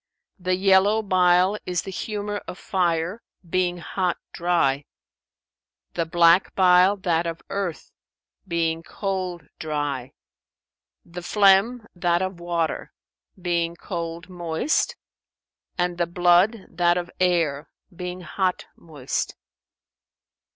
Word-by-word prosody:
The 185 0 0
yellow 195 +3 +4
bile 185 0 +3
is 180 -2 -1
the 195 - -6
humour 205 +1 -4
of 180 - -7
fire, 175 +2 -1 0.3
being 180 0 0
hot 180 +1 -2 0.2
dry; 150 -5 +1 1.1
the 170 -2 -1
black 170 +2 +4
bile 185 +1 +5
that 170 -3 0
of 165 0 -5
earth, 195 -5 -3 0.6
being 165 -2 0
cold 185 -2 -4 0.2
dry; 145 -4 -3 0.9
the 175 +1 -8
phlegm 205 +5 +4
that 175 0 +1
of 185 -2 -4
water, 170 -2 -2 0.5
being 170 -1 -1
cold 170 -1 -5
moist, 175 - -1 0.8
and 175 0 -1
the 175 - +1
blood 175 +5 +3
that 175 0 +2
of 175 0 -4
air, 165 -5 +1 0.3
being 180 0 -5
hot 180 +2 -1
moist. 145 -6 -4
175 Hz, 110 wpm, -24 LUFS, 170-190 Hz, 1.1 s, bile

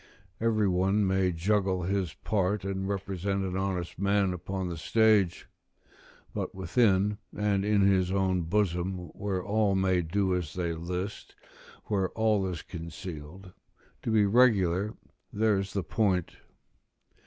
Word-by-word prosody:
Every 110 -2 +2
one 95 +3 +2
may 95 -1 +2
juggle 95 +1 0
his 95 -3 -1
part, 100 -1 -1
and 95 0 -2
represent 100 0 -2
an 95 -1 -3
honest 95 -3 -3
man 100 -1 +2
upon 95 +1 -4
the 85 - -4
stage: 105 +1 +2 0.9
but - - -4
within, 100 0 +2 0.2
and 100 -2 +1
in 105 0 +2
his 95 -2 +3
own 95 -2 +1
bosom, 90 0 -1
where 95 -3 -3
all 105 -1 +1
may 95 -1 +2
do 95 +3 0
as 85 -5 -4
they 85 -2 -1
list, 90 +4 -5 0.5
where 95 -3 0
all 110 -3 +2
is 90 -3 -5
concealed, 85 +1 -8 0.5
to - - -3
be 110 -2 +4
regular, 100 -4 +3 0.4
there's 100 -2 +1
the 100 - -1
point. 95 -4 0
95 Hz, 130 wpm, -29 LUFS, 90-100 Hz, 0.9 s, be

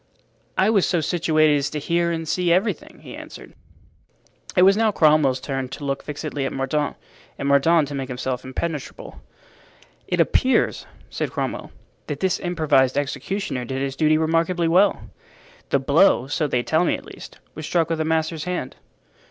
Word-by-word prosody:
"I 190 +3 +3
was 200 -5 +3
so 175 - +1
situated 155 -2 +2
as 140 0 -1
to 150 - -5
hear 170 +3 0
and 165 -1 -3
see 180 +1 +1
everything," 190 +5 -1
he - - -9
answered. - - -11 1.0
It 180 - +5
was 195 +1 +6
now 220 0 +2
Cromwell's 150 -7 +3
turn 135 -1 -4
to 145 - -7
look 140 0 -2
fixedly 150 -1 -5
at 135 - -2
Mordaunt, 140 +2 -1 0.4
and 140 - -3
Mordaunt 145 +3 +4
to - - -6
make 135 -1 -4
himself 125 0 -4
impenetrable. 145 +2 -6 0.9
"It - - -1
appears," 260 0 +2 0.2
said - - -2
Cromwell, - - -4 0.4
"that - - -4
this 190 -1 0
improvised 155 -7 +1
executioner 145 0 -3
did 130 +2 -3
his 135 -1 -3
duty 155 +1 +3
remarkably 165 +2 +1
well. 185 +5 +2 0.6
The - - +3
blow, 140 +1 +3
so 145 +2 -1
they 125 -3 0
tell 160 +6 +2
me - - +1
at - - -10
least, - - -12 0.2
was 155 0 -7
struck 165 -2 +1
with 165 -1 -1
a - - -1
master's 160 0 -1
hand." 180 -7 -4
155 Hz, 170 wpm, -22 LUFS, 140-170 Hz, 1.0 s, was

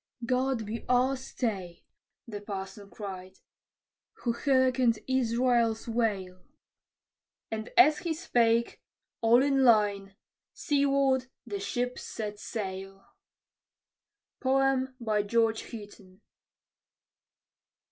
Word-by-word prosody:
"God 255 -1 0
be 220 +2 -5
our 255 +2 +3
stay," 205 -9 -4 0.4
the 205 -3 -6
parson 200 0 -7
cried, 190 -3 -8 0.9
"who 235 - +1
hearkened 255 -2 +2
Israel's 240 -3 +1
wail!" 200 -6 -1 1.1
And 220 0 -4
as 305 -4 +7
he 340 -3 -2
spake, 235 -5 +1 0.4
all 235 +3 +5
in 275 -1 +2
a - - +4
line, 205 -5 +3 0.4
seaward 275 -3 +1 0.2
the 205 -4 -4
ships 245 +5 -3
set 210 -2 -6
sail. 195 -2 -6 1.4
GEORGE 255 -5 +1
HOUGHTON. 205 -3 -11
230 Hz, 85 wpm, -29 LUFS, 205-260 Hz, 1.4 s, as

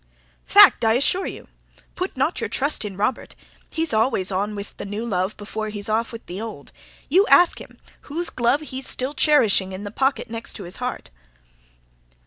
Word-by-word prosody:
"Fact, - - +7
I 225 0 +4
assure 280 +10 +1
you. - - -8 0.5
Put 365 -5 -4
not 275 +6 0
your - - -2
trust 280 -1 -1
in 200 -3 -6
Robert! 210 +5 -2 0.3
He's 325 -2 -1
always 215 -4 +1
on 205 +3 -1
with 200 0 -8
the - - -6
new 205 +3 -4
love 190 -2 -1
before 215 +1 -5
he's 205 0 -5
off 225 +2 0
with 230 -1 -9
the 185 +4 -6
old. 220 -11 -8 0.4
You 380 +8 +4
ask 355 -1 +5
him - - -13 0.3
whose 335 +4 -1
glove 255 +4 +1
he's 265 -3 -4
still 260 +3 -3
cherishing 220 -12 +3
in 190 +2 -6
the 205 - -6
pocket 265 +1 0
next 230 0 -1
his 185 -3 -7
heart." 250 - -5
225 Hz, 180 wpm, -22 LUFS, 205-275 Hz, 0.5 s, Fact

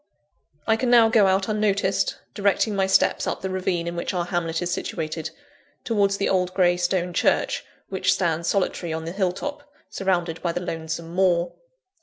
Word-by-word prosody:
I 225 0 +3
can 250 +1 0
now 235 -2 +6
go 220 -3 +5
out 190 +1 +2
unnoticed, 200 -3 0 0.2
directing 205 +1 +1
my 195 -1 +1
steps 190 - +2
up - - -2
the 190 - -2
ravine 185 -2 -1
in 170 0 -4
which 170 +2 -3
our 175 -1 0
hamlet 170 -2 -2
is 175 0 -2
situated, 160 -1 -3 0.5
towards 200 -3 +1
the 200 - 0
old 185 -1 0
grey 175 -2 +4
stone 180 0 0
church - - +1 0.3
which - - +1
stands 170 -2 -1
solitary 180 -3 0
on 160 0 -4
the 165 - -4
hill 190 -1 0
top, 290 +10 -5 0.3
surrounded 175 -4 -1
by 170 -2 -1
the 175 - -2
lonesome 165 -1 -5
moor. 175 -2 +2
185 Hz, 180 wpm, -24 LUFS, 170-195 Hz, 0.5 s, now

